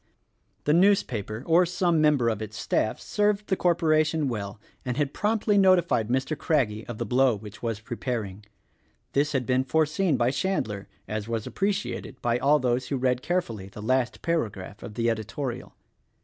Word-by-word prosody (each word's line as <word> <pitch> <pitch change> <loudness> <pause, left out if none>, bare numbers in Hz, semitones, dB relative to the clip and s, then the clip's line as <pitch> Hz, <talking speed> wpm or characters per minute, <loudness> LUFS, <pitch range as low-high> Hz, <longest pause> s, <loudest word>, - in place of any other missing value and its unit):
The 150 - +2
newspaper, 130 - +2
or 170 +2 +5
some 175 -2 +1
member 150 -6 +3
of 110 -2 -2
its 110 0 -6
staff, 110 - 0
served 210 0 0
the 190 - 0
cor 175 -2 +2
poration 155 -1 +2
well, 105 -4 -4 0.2
and 125 -1 -3
had 145 -2 0
promptly 210 -1 +1
notified 175 - +4
Mr. 130 +5 0
Craggie 115 -8 0
of 120 -3 -6
the 120 - -3
blow 125 +2 +3
which 105 0 -11
was 115 -3 -2
preparing. 115 -4 -4 0.7
This 145 +2 +1
had 130 -3 0
been 130 +1 +2
foreseen 160 +3 +1
by 120 +1 +2
Chandler 130 - -2
— - - -39
as 105 0 -4
was 115 -2 -2
appreciated 195 -9 -2
by 120 0 0
all 145 +3 +4
those 125 -2 0
who 140 - -1
read 125 -1 +1
care 180 +5 +1
fully 105 - -8
the 100 - -11
last 125 +3 0
paragraph 110 - -2
of 105 - -8
the 115 0 0
editorial. 115 +3 -3
130 Hz, 175 wpm, -26 LUFS, 110-165 Hz, 0.7 s, or